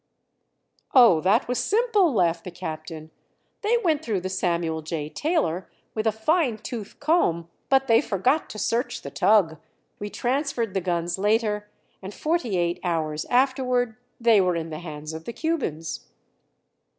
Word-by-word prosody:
"Oh, 230 -11 +7
that 200 +8 +3
was 250 0 -1
simple," 420 -5 +3
laughed 170 -7 +1
the - - -6
captain. 160 -2 -7 0.5
"They 445 +3 +2
went 320 -9 +1
through 210 - -1
the 185 - -3
Samuel 170 -3 -1
J. 155 -1 -4
Taylor 290 - -1 0.2
with 215 0 -1
a - - +4
fine 245 - +1
tooth 220 -1 -7
comb; 285 - +1 0.2
but 270 0 +4
they 230 -1 +5
forgot 255 - 0
to - - -8
search 235 +4 -1
the 140 - -7
tug. 175 +2 +3 0.4
We 205 - -4
transferred 250 -3 -1
the 190 - 0
guns 175 0 -1
later, 210 0 +1 0.3
and 195 +1 -8
forty 310 - 0
eight 175 0 0
hours 155 -3 -1
afterward 250 -2 +1 0.2
they 230 -4 +5
were 180 -1 +1
in 165 -1 -4
the 155 - -5
hands 155 -2 -7
of 160 0 -8
the 235 - -5
Cubans." 165 - -3
210 Hz, 155 wpm, -25 LUFS, 170-255 Hz, 0.5 s, Oh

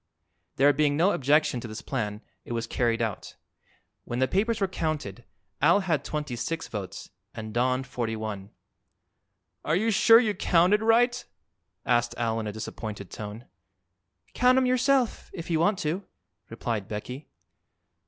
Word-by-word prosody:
There 145 +2 +5
being 145 0 +2
no 180 +5 +4
objection 145 -4 +2
to 120 - -7
this 110 0 -8
plan 105 -5 -3 0.2
it - - -6
was 115 0 -2
carried 115 -1 0
out. 110 -4 -4 0.7
When 120 - -4
the 130 +1 +2
papers 210 - 0
were 195 - +1
counted 150 - -4 0.4
Al 170 +8 +5
had 160 -7 0
twenty 150 -4 -4
six 165 +8 -3
votes 100 -4 -7 0.2
and 110 -1 -6
Don 130 +2 +1
forty 120 -3 -3
one. 105 -3 -5 1.1
"Are 155 - +1
you 220 +5 +1
sure 225 +3 +7
you 220 -4 +1
counted 185 +2 +3
right?" 240 +2 +3 0.6
asked 120 -1 +1
Al 115 -1 0
in 110 - -4
a - - -2
disappointed 105 -2 -7
tone. 105 +3 -7 0.9
"Count 250 +1 +4
'em 260 - +4
yourself, 255 0 +1
if 170 0 -6
you 160 - +2
want 195 +4 +2
to," 180 +2 -2 0.5
replied 115 -3 -3
Becky. 125 +7 -6
140 Hz, 155 wpm, -27 LUFS, 115-190 Hz, 1.1 s, sure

